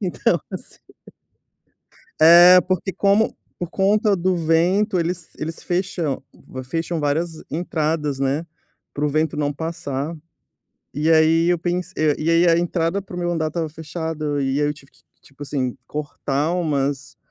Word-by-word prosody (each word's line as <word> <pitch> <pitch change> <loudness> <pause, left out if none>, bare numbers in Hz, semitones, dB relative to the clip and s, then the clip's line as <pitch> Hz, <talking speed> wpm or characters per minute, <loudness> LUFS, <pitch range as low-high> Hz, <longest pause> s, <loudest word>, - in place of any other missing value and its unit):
então 185 -4 0
assim - - -9 1.4
É, 175 +3 +9
porque 185 +2 -2
como 200 +4 +2 0.2
por 175 -1 -4
conta 205 +2 +2
do 185 +1 0
vento, 175 +5 +2
eles 170 0 -3
eles 160 +2 -5
fecham 175 -6 -2 0.4
fecham 165 +4 -3
várias 160 +3 -2
entradas, 155 -3 -2
né, 140 +4 0 0.5
para 145 +1 -1
o - - +1
vento 155 +1 0
não 145 -1 0
passar. 160 -1 -4 0.8
E 155 +3 +1
aí 160 +1 +4
eu 175 - +2
pensei 180 +2 -3 0.2
eh, - - +2
e 160 +2 0
aí 170 +1 +4
a 165 0 +4
entrada 175 +2 0
para 180 -2 -10
o - - -4
meu 175 0 -1
andar 160 -2 -1
estava 160 0 -3
fechada 155 -2 -4
e 135 +2 0
aí 145 - +2
eu 150 - 0
tive 140 -2 -18
que, - - -26 0.2
tipo 140 +1 -14
assim, 135 -3 -2
cortar 150 +1 -2
umas 140 -4 -2
165 Hz, 155 wpm, -21 LUFS, 150-175 Hz, 1.4 s, É